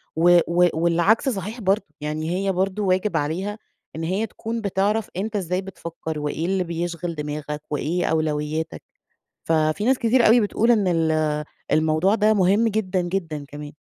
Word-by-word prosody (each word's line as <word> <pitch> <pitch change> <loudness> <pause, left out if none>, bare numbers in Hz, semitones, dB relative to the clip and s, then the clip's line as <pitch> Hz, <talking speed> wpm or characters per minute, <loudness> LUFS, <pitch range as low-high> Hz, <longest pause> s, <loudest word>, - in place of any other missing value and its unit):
و 175 +2 +6
و 175 +1 +4
والعكس 170 - +2
صحيح 215 +1 -4
برضه، 195 +1 +2 0.2
يعني 155 +1 -3
هي 195 +2 0
برضه 190 +2 -1
واجب 190 +2 +1
عليها 185 +8 -2 0.4
إن 160 - -4
هي 190 +7 -1
تكون 230 +1 -5
بتعرف 205 +2 0
أنت 210 +3 -3
إزاي 180 -2 -1
بتفكّر، 170 -4 -6
وإيه 150 +2 -2
اللي 190 +1 +1
بيشغل 170 0 -3
دماغك، 150 0 -5
وإيه 160 +4 -1
أولوياتك، 155 0 -1 0.6
ففي 155 +4 +1
ناس 260 +1 +3
كتير 235 0 +4
أوي 230 +2 +6
بتقول 220 +3 +2
إن 210 -5 +3
ال 155 -3 +1 0.3
الموضوع 160 +6 +3
ده 215 0 +3
مهم 200 +3 +3
جدًا، 195 -4 0
جدًا 170 -5 -3
كمان. 145 0 -8
180 Hz, 155 wpm, -23 LUFS, 160-205 Hz, 0.6 s, و